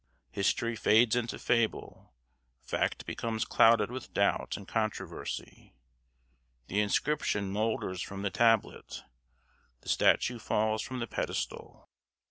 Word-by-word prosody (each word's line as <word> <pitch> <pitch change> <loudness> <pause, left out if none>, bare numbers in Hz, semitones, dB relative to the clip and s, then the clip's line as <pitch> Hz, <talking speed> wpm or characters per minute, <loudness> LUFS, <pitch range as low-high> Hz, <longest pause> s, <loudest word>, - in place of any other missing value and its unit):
History 115 +4 0
fades 110 +1 +4
into 120 -1 -2
fable; 115 - -1 0.5
fact - - -1
becomes 110 -1 -3
clouded 115 +1 +4
with 130 0 -8
doubt - - +1
and 100 - -11
controversy; 110 - -4 0.9
the 100 +10 0
inscription 105 -3 0
moulders 105 -3 -1
from 100 +1 -6
the 100 - -1
tablet; 115 -2 +1 0.8
the - - -10
statue 120 -1 +3
falls 110 0 0
from 130 -2 -5
the 115 - -3
pedestal. - - -4
110 Hz, 110 wpm, -30 LUFS, 100-115 Hz, 0.9 s, fades